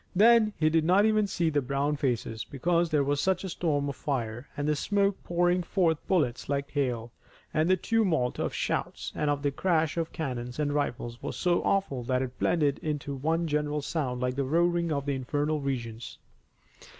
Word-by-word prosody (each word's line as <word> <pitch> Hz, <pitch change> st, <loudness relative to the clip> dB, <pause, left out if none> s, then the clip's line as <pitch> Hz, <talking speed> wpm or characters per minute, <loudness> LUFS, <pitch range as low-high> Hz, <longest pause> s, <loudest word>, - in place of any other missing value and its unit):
Then 220 Hz, +2 st, +6 dB
he 155 Hz, -1 st, +2 dB
did 160 Hz, 0 st, +3 dB
not 185 Hz, +5 st, +4 dB
even 215 Hz, -1 st, +3 dB
see 170 Hz, -4 st, 0 dB
the 145 Hz, -1 st, +2 dB
brown 140 Hz, +3 st, 0 dB
faces, 120 Hz, -5 st, -2 dB
because 170 Hz, +5 st, 0 dB
there 150 Hz, -3 st, +2 dB
was 145 Hz, +1 st, 0 dB
such 190 Hz, -1 st, +1 dB
a 190 Hz, -, -4 dB
storm 150 Hz, -5 st, 0 dB
of 140 Hz, -, -3 dB
fire 120 Hz, -3 st, -3 dB
and 150 Hz, +1 st, +1 dB
smoke 200 Hz, +4 st, 0 dB
pouring 175 Hz, +1 st, +2 dB
forth 170 Hz, -3 st, +1 dB
bullets 140 Hz, -11 st, 0 dB
like 140 Hz, 0 st, -1 dB
hail, 120 Hz, -5 st, -1 dB, 0.4 s
and 155 Hz, +2 st, +2 dB
the 185 Hz, -, +4 dB
tumult 180 Hz, -, +1 dB
of -, -, -1 dB
shouts -, -, -2 dB
and 150 Hz, -, -1 dB
of 145 Hz, 0 st, -1 dB
the 145 Hz, -, +1 dB
crash 165 Hz, +1 st, +1 dB
of 165 Hz, -1 st, -1 dB
cannon 125 Hz, -5 st, -4 dB
and 145 Hz, -1 st, 0 dB
rifles 120 Hz, -4 st, -2 dB
was -, -, -5 dB
so 175 Hz, -1 st, +2 dB
awful 195 Hz, -10 st, 0 dB
that 130 Hz, +1 st, +1 dB
it 130 Hz, -1 st, -7 dB
blended 145 Hz, -5 st, +2 dB
into 145 Hz, -2 st, -3 dB
one 160 Hz, +5 st, 0 dB
general 150 Hz, -1 st, -1 dB
sound 135 Hz, -6 st, -2 dB
like 125 Hz, 0 st, 0 dB
the 140 Hz, -, 0 dB
roaring 170 Hz, +3 st, +1 dB
of 140 Hz, -2 st, -1 dB
the 140 Hz, -, 0 dB
infernal 145 Hz, +3 st, -1 dB
regions. 120 Hz, -4 st, -4 dB
150 Hz, 190 wpm, -28 LUFS, 135-170 Hz, 0.4 s, Then